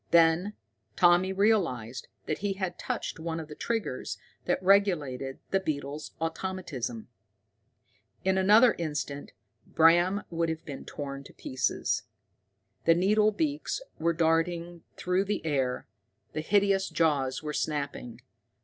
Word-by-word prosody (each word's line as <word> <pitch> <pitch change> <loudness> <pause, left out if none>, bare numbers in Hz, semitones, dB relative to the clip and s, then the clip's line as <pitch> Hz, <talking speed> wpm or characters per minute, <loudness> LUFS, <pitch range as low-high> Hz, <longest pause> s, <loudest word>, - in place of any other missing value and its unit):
Then 170 +4 +4 0.4
Tommy 175 +1 +5
realized 180 - +1 0.2
that 155 - -2
he 200 0 -1
had 190 -2 -4
touched - - -3
one 165 0 -3
of 160 - -7
the 150 - -8
triggers 225 - -3 0.3
that - - 0
regulated 155 -10 +2
the 195 - +3
beetle's 150 -4 -4
automatism. 165 - -4 1.2
In 190 0 +3
another 210 +5 +6
instant 150 -3 -3 0.4
Bram 175 +5 +4
would 165 0 0
have 160 0 -4
been 140 -3 -7
torn 140 -2 -6
to - - -13
pieces. 130 -1 -1 0.8
The 165 - +6
needle 210 +4 +4
beaks 295 - -1 0.2
were 165 +1 +2
darting 170 +1 0 0.2
through 180 +2 +1
the 205 -4 -2
air, 135 -5 0 0.5
the 155 - -2
hideous 195 +2 +2
jaws 140 -5 +1
were 150 -1 -3
snapping. 140 -6 -3
165 Hz, 125 wpm, -29 LUFS, 145-190 Hz, 1.2 s, another